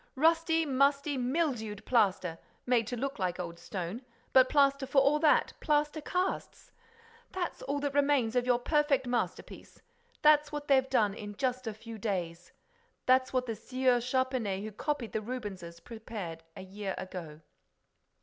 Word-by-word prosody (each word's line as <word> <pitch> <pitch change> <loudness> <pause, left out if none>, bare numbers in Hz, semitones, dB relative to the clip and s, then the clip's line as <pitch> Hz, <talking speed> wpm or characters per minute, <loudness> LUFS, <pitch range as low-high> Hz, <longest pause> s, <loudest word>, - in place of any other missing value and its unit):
Rusty, 325 +2 +3
musty, 280 +1 +2
mildewed 250 -6 -1
plaster, 195 -8 +1 0.3
made 240 -3 +2
to 245 - -3
look 275 +1 -3
like 180 -2 -1
old 170 -1 -6
stone—but 230 +8 0
plaster 275 -2 +3
for 270 - +4
all 280 +2 +3
that, 305 -1 +3
plaster 300 +1 +1
casts!—That's 460 +3 -5
all 285 +2 -2
that 285 -1 -2
remains 280 -5 +2
of 250 0 +1
your 245 -1 +4
perfect 285 0 +1
masterpiece!—That's 300 - -1
what 295 -1 -5
they've 265 -1 +3
done 215 -6 +2
in 205 -1 -8
just 255 +1 -2
a 220 - -2
few 225 0 -9
days! 175 -5 -3 0.5
That's 255 0 +4
what 255 -1 0
the 230 - -3
Sieur 255 +2 +1
Charpenais 250 -6 -1
who 215 - -5
copied 250 +1 -3
the 220 - -2
Rubenses, 200 -8 -6
prepared 210 -6 -7 0.2
a - - -7
year 195 +1 -5
ago." 165 -5 -7
255 Hz, 145 wpm, -31 LUFS, 210-285 Hz, 0.5 s, for